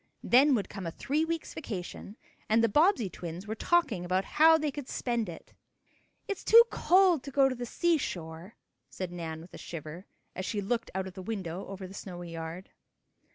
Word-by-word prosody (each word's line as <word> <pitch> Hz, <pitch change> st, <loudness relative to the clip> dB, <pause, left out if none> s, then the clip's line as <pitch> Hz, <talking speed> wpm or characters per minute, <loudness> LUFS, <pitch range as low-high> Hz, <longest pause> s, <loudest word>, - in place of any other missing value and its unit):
Then 270 Hz, +3 st, +5 dB
would 205 Hz, -, -1 dB
come 195 Hz, -4 st, -6 dB
a -, -, -3 dB
three 290 Hz, -, -1 dB
week's 330 Hz, 0 st, -3 dB
vacation, 205 Hz, -, -7 dB, 0.3 s
and 225 Hz, +1 st, +4 dB
the -, -, +5 dB
Bobbsey 295 Hz, -, +3 dB
twins 175 Hz, +1 st, -7 dB
were 215 Hz, -, -3 dB
talking 225 Hz, -, +1 dB
about 185 Hz, +2 st, 0 dB
how 320 Hz, +1 st, +6 dB
they 305 Hz, -2 st, -1 dB
could 280 Hz, -1 st, -7 dB
spend 235 Hz, -5 st, -1 dB
it. 165 Hz, -, -11 dB, 0.7 s
"It's 400 Hz, -, -4 dB
too 465 Hz, +1 st, +9 dB
cold 365 Hz, -4 st, +4 dB
to 280 Hz, -, -8 dB
go 275 Hz, 0 st, +4 dB
to 265 Hz, -, -1 dB
the 245 Hz, -1 st, -5 dB
seashore," 185 Hz, -, -2 dB, 0.3 s
said 185 Hz, -2 st, -5 dB
Nan 165 Hz, -2 st, -5 dB
with 175 Hz, -, -14 dB
a -, -, -9 dB
shiver, 165 Hz, +2 st, -8 dB, 0.3 s
as 185 Hz, -, -4 dB
she 205 Hz, +2 st, -2 dB
looked 230 Hz, +4 st, -2 dB
out 190 Hz, 0 st, -1 dB
of 190 Hz, -, -8 dB
the 190 Hz, -, -8 dB
window 190 Hz, -3 st, -5 dB
over 195 Hz, -1 st, -7 dB
the 185 Hz, -, -10 dB
snowy 175 Hz, -3 st, -8 dB
yard. 165 Hz, +3 st, -7 dB
205 Hz, 195 wpm, -30 LUFS, 180-280 Hz, 0.7 s, too